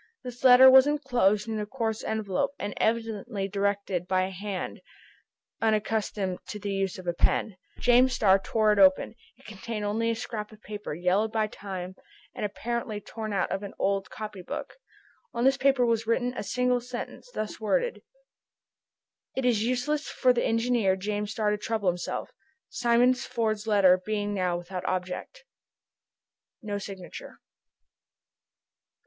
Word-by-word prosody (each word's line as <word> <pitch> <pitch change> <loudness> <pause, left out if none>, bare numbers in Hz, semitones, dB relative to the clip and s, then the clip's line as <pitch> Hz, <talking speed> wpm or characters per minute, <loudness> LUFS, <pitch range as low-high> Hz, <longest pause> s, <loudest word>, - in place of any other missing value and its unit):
This 245 -1 -9
letter 255 0 +9
was 265 +1 +8
enclosed 245 -8 +1
in 220 -1 -2
a 210 - -2
coarse 225 -2 -2
envelope, 220 +6 -1
and 205 0 -4
evidently 220 -3 -1
directed 200 -2 -1
by 185 0 +2
a 190 - -3
hand 195 0 -5 0.8
unaccustomed 215 -3 0
to - - -5
the 205 -1 -4
use 195 -1 -1
of 185 - -10
a 175 - 0
pen. 190 +3 +1 0.2
James 250 +1 +4
Starr 195 -5 +4
tore 215 +2 +2
it 205 - 0
open. 190 +1 +5 0.2
It - - -22
contained 215 +1 -5
only 225 +3 0
a 230 - 0
scrap 220 -2 -5
of 215 - -15
paper, 210 -7 -6
yellowed 185 +6 +1
by 220 -1 +1
time, 190 -3 -7 0.4
and - - -6
apparently 220 +1 -3
torn 215 +1 -6
out 195 -2 0
of 195 - -2
an 200 -1 -8
old 195 -1 0
copy 210 -3 -7
book. 180 - -6 0.6
On 235 - 0
this 270 +1 +5
paper 270 -2 +3
was 230 -1 0
written 245 +2 +1
a - - -3
single 250 +3 +1
sentence, 245 - -7
thus 215 -1 -4
worded: 485 - 0 1.3
"It 265 - -1
is 230 -4 +3
useless 255 +5 -1
for 255 -1 +3
the 240 - 0
engineer 230 -4 +2
James 205 +2 -3
Starr 215 -1 0
to 210 - 0
trouble 215 -3 0
himself, 175 0 -4 0.4
Simon 240 +1 +3
Ford's 225 -4 -2
letter 190 -4 +5
being 205 0 -2
now 180 -3 0
without 180 +1 -6
object." 185 - -4 1.2
No 205 -2 -3
signature. 190 -2 -9
215 Hz, 155 wpm, -27 LUFS, 195-235 Hz, 1.3 s, letter